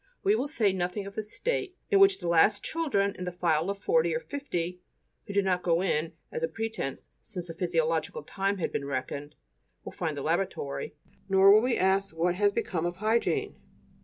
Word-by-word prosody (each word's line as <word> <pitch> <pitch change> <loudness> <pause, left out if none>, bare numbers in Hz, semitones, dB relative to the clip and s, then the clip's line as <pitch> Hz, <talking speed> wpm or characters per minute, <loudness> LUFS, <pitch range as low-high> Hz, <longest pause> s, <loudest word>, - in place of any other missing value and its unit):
We 400 0 +4
will 290 - 0
say 225 -10 +1
nothing 185 +2 -2
of 200 - -8
the 220 - -2
state 375 - -3
in 400 - +5
which 390 0 +6
the 175 - -5
last 170 +5 +4
children 255 -12 0
in 180 - -6
the 180 - -3
file 170 -1 +1
of 200 - -2
forty 475 - +2
or - - 0
fifty 180 - -4 0.5
(who 200 - -5
did 200 -1 +2
not 180 -1 +1
go 175 0 +2
in 160 -3 0 0.2
as - - -4
a 165 - +1
pretence, 220 -6 -4
since 185 -6 -6
the 165 - -7
'physiological 475 - -1
time' 195 +1 -1
had 180 - -2
been 140 - -2
reckoned) 140 +2 -4 0.5
will - - -6
find 155 -3 -3
the 140 - -4
lavatory; 165 -4 -2 0.3
nor 195 +1 +7
will 215 +1 +7
we 250 +1 +1
ask 190 -1 +1
what 175 +2 +2
has 205 +2 +2
become 175 -4 -1
of 175 - -4
hygiene. 235 - 0
195 Hz, 200 wpm, -28 LUFS, 170-225 Hz, 0.5 s, nor